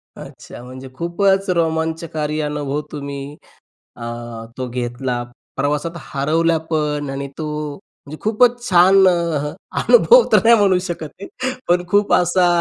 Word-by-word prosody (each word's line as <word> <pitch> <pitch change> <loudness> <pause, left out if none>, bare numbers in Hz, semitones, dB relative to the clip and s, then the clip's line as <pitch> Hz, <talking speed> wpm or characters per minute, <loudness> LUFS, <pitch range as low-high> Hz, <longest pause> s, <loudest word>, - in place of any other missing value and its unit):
अच्छा. 135 -4 -11
म्हणजे 130 +1 -10
खूपच 190 +4 +1
रोमांचकारी 160 -2 -1
अनुभव 150 -1 -2
तुम्ही 140 0 -6 0.6
अ, - - -11 0.6
तो 130 -1 -3
घेतला. 120 0 -3 0.3
प्रवासात 145 +4 -1
हरवल्या 160 +3 0
पण 150 -2 -1
आणि 140 +1 -4
तो 155 - -3 0.3
म्हणजे 155 -4 -14
खूपच 240 +3 +3
छान 190 +2 +6
अ, 165 -4 -1 0.3
अनुभव 485 0 +6
तर - - +6
नाही 235 - +7
म्हणू 195 -3 +3
शकत 165 -4 -5
आहे, 255 +5 -4 0.2
पण 175 0 +2
खूप 205 +2 +2
असा 180 +1 +3
160 Hz, 130 wpm, -19 LUFS, 140-180 Hz, 0.6 s, नाही